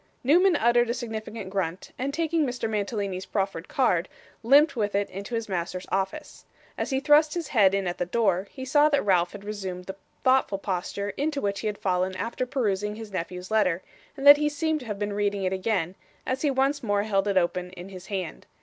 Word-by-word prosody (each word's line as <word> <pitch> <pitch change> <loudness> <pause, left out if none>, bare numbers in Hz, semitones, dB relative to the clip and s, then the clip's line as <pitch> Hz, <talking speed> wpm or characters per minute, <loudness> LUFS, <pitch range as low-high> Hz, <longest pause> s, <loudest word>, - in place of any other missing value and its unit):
Newman 345 +7 +5
uttered 240 -2 +3
a 235 - 0
significant 220 -4 -6
grunt, 185 -2 -3
and 270 +2 -2
taking 325 +1 0
Mr. 250 -4 -2
Mantalini's 200 -3 -2
proffered 190 -4 -2
card, 185 -10 +1 0.3
limped 280 +7 +5
with 210 -3 -1
it 200 0 +1
into 200 +5 -5
his 230 -1 -2
master's 180 -1 -3
office. 195 +11 -3 0.3
As - - -3
he 265 -2 +1
thrust 300 +2 +4
his 340 -3 -3
head 195 -6 +4
in 195 -1 -1
at 175 0 -3
the 175 - -1
door, 195 -2 +1
he 260 - -8
saw 295 +3 +4
that 285 -6 +1
Ralph 180 -3 +2
had 205 -1 -9
resumed 190 -3 -5
the 190 - -6 0.3
thoughtful 260 -6 +3
posture 200 +1 -3
into 290 0 -1
which 200 -4 -1
he - - -3
had 210 -1 -2
fallen 185 0 0
after 235 +5 -3
perusing 210 -6 -1
his 220 -1 -9
nephew's 180 +1 -5
letter, 190 -5 +2 0.3
and 275 - -5
that 285 0 +11
he 300 0 +1
seemed 310 +1 -1
to 250 - -10
have 210 -2 -3
been 205 0 -2
reading 205 -1 -1
it 185 0 0
again, 185 -3 -1 0.3
as 260 +1 -2
he 295 - +2
once 270 +2 +1
more 205 -3 +1
held 200 -2 0
it 200 -2 +1
open 180 0 0
in 180 +1 -9
his 185 -1 -10
hand. 185 -5 -5
205 Hz, 215 wpm, -26 LUFS, 190-260 Hz, 0.3 s, that